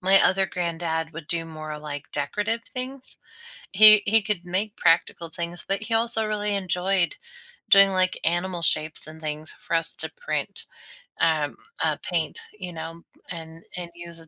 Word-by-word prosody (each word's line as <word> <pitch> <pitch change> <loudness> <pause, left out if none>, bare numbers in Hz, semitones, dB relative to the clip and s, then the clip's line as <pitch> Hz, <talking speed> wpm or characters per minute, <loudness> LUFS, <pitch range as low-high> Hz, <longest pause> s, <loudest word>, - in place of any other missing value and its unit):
My 190 +1 +6
other 190 0 +4
granddad 165 -2 -2
would 155 -1 -8
do 165 -1 -1
more, 155 -1 -6
like, 150 -1 -7
decorative 210 +11 -1
things. 260 +1 -7 0.6
He 215 +1 +9
he 220 +1 +4
could 200 -4 -1
make 200 +4 -2
practical 165 0 +2
things, 170 +2 -5
but 195 +2 -1
he 225 - -3
also 225 0 +1
really 210 -1 -1
enjoyed 185 -1 +1 0.5
doing, 195 0 +8
like, 185 -1 +1
animal 175 +1 0
shapes 155 -1 -1
and 160 +1 -11
things 155 0 -5
for - - -2
us 165 0 -3
to - - -4
print - - -4 0.5
um, 155 -3 +2 0.3
uh, - - +1
paint, 170 -3 -1 0.2
you 180 -2 -6
know, 165 +1 -7 0.3
and 165 -1 -8
and 175 -1 -6
use 170 -1 -10
as 165 - -15
175 Hz, 165 wpm, -25 LUFS, 165-200 Hz, 0.6 s, He